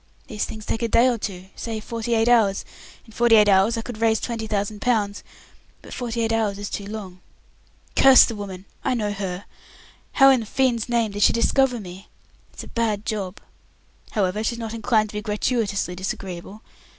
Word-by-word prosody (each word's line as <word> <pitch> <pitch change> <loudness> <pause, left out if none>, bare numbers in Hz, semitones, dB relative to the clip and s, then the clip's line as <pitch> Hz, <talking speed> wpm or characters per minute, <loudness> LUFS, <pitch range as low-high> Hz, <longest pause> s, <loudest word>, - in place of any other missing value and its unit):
These 215 -5 -3
things 215 -1 -8
take 225 - -2
a 230 - +1
day 235 +3 +4
or 240 -3 0
two, 185 -3 -5
say 225 -2 -4
forty 230 +1 -3
eight 225 +1 +2
hours. 220 -5 +3 0.4
In 225 - -17
forty 235 0 +4
eight 210 -1 +6
hours 200 +4 +4
I 225 - -3
could 225 -2 -8
raise 225 -1 +3
twenty 230 -2 -4
thousand 205 0 -2
pounds, 210 -5 0 0.6
but - - -10
forty 235 -2 -3
eight 225 0 0
hours 215 -3 0
is 205 0 -6
too 200 - -5
long. 200 -4 -7 0.8
Curse 270 -1 +8
the 230 - -4
woman! 195 -2 -7 0.2
I 260 - +1
know 210 -3 -1
her! 195 -1 -5 0.7
How 270 -1 +7
in 260 - +4
the 220 - -6
fiend's 245 -2 0
name 230 -3 +1
did 205 +1 -5
she - - +5
discover 250 +1 +2
me? 190 0 -10 0.4
It's - - -9
a - - -11
bad 220 -3 -1
job. 200 -3 -4 0.7
However, 205 0 0
she's 235 +1 -1
not 225 -1 -5
inclined 220 -1 +1
to - - -12
be - - -3
gratuitiously 210 -3 -1
disagreeable. 190 +2 -6
220 Hz, 195 wpm, -23 LUFS, 200-230 Hz, 0.8 s, Curse